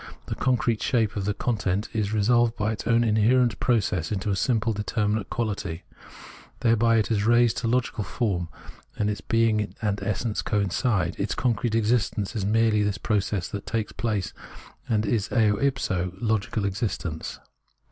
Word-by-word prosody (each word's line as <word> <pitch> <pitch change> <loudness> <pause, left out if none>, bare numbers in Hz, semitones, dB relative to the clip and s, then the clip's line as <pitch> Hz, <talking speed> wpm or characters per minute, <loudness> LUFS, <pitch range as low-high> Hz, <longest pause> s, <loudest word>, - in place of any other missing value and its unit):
The - - -4
concrete 120 -3 +1
shape 115 -4 +1
of 100 -2 -2
the 105 0 -1
content 105 -4 -1
is 105 -2 -1
resolved 115 +2 +3
by 105 +1 0
its 110 - -5
own 115 0 +4
inherent 115 +2 +3
process 95 -8 +1
into 105 0 -1
a - - +1
simple 115 0 +1
determinate 105 0 -1
quahty. 100 -7 -3 0.8
Thereby 115 0 +3
it 110 0 +1
is 105 -2 +1
raised 120 0 +4
to - - -1
logical 120 -2 0
form, 95 -7 -2 0.5
and 105 0 +1
its 105 - -5
being 110 -2 +1
and 105 -2 -1
essence 110 0 -1
coincide; 100 -1 0
its - - -1
concrete 120 -2 0
existence 110 -2 0
is 105 - -1
merely 110 0 +3
this 105 -1 0
process 100 -3 -1
that 100 -1 -6
takes 110 -2 -2
place, 105 -5 -2 0.6
and 110 -1 +1
is 105 -1 0
eo 105 -4 +3
ipso 95 -10 0
logical 110 0 0
existence. 95 -6 -3
110 Hz, 155 wpm, -25 LUFS, 100-115 Hz, 0.8 s, own